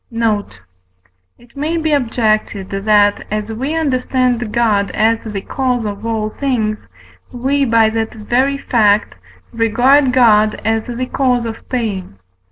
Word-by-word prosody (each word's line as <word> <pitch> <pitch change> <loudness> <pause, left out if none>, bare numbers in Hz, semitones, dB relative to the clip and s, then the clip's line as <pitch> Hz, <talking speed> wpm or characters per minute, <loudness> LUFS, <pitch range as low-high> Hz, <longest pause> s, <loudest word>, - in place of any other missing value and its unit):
Note. 215 - -2 0.8
It 240 +2 -22
may 305 +4 -2
be 315 -1 -1
objected 215 -6 0
that, 205 +1 +2
as 215 +1 -3
we 270 +8 -3
understand 255 -5 0
God 210 -4 +1
as 225 +1 +2
the 210 -3 -5
cause 250 0 -2
of 205 +2 -5
all 215 -1 -2
things, 220 - -2 0.4
we 270 +3 0
by 230 -2 +4
that 225 0 -3
very 255 +6 0
fact 210 -6 +2 0.4
regard 250 +5 +3
God 215 -4 +4
as 225 0 0
the 245 +1 -4
cause 250 -2 0
of 225 0 -8
pain. 205 - -3
230 Hz, 135 wpm, -16 LUFS, 215-255 Hz, 0.8 s, by